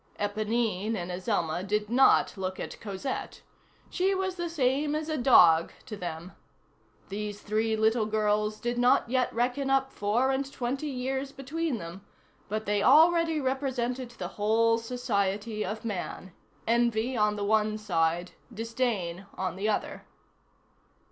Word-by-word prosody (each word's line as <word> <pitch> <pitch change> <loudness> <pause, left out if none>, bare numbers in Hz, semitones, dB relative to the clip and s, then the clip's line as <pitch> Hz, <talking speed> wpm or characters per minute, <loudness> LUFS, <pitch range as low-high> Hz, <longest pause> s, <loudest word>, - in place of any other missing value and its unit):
Éponine 215 0 -1
and 180 -3 -4
Azelma 180 -3 -1
did 210 +2 -1
not 255 +4 +4
look 190 -1 -4
at - - -7
Cosette. 210 +6 -5 0.5
She 385 +1 +1
was 380 0 -1
the 345 -1 -4
same 290 -1 +1
as 310 +1 -3
a 310 - 0
dog 175 - +6
to 215 - -6
them. 175 -1 -6 0.8
These 205 +1 -5
three 220 +1 0
little 220 0 +2
girls 210 0 0
did 240 0 -2
not 245 -1 +4
yet 255 -1 +1
reckon 250 +4 -1
up 270 0 +2
four 230 +6 +1
and 270 +1 -2
twenty 265 +4 -3
years 265 0 -3
between 285 +1 -3
them, 175 +1 -8 0.5
but 215 +1 -2
they 205 0 +1
already 325 +4 +5
represented 260 -2 -2
the 185 -7 -6
whole 230 +2 +3
society 215 -3 -2
of 215 +4 -5
man; 190 -2 -5 0.3
envy 235 +1 +1
on 210 -2 +2
the 205 -1 -3
one 215 0 +2
side, 175 -4 0 0.2
disdain 220 -6 -2
on 185 -2 -2
the 200 +3 -1
other. 210 - -3
225 Hz, 140 wpm, -28 LUFS, 205-260 Hz, 0.8 s, dog